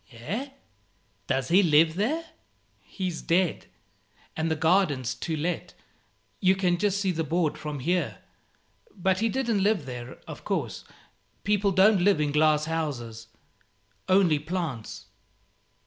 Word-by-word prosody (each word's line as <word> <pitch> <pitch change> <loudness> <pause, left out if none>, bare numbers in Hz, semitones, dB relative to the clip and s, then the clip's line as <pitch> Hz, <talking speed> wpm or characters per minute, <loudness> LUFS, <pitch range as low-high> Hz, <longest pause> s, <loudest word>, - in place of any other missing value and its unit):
"Eh? 185 - -5 0.8
does 135 -1 -1
he 185 +4 +6
live 160 -2 +4
there?" 270 - -1 0.5
"He's 185 -4 -5
dead, 175 0 +1 0.7
and 160 +1 -1
the 160 - +1
garden's 160 -6 +2
'to 160 -2 -4
let;' 170 +4 -3 0.6
you 190 -1 +4
can 180 -2 +1
just 200 0 +1
see 195 -2 +1
the 165 -2 -2
board 160 -1 0
from 150 -2 -6
here. 175 +6 0 0.8
But 190 -1 +1
he 225 +1 +1
didn't 230 -4 0
live 200 -6 +1
there, 125 -1 -7
of - - -9
course. - - -3 0.6
People 205 0 +2
don't 195 +1 +5
live 195 -2 +4
in 150 -1 +1
glass 150 0 +3
houses; 125 -9 -4 0.8
only 185 -5 +4
plants." 155 -7 -5
170 Hz, 130 wpm, -27 LUFS, 150-195 Hz, 0.8 s, he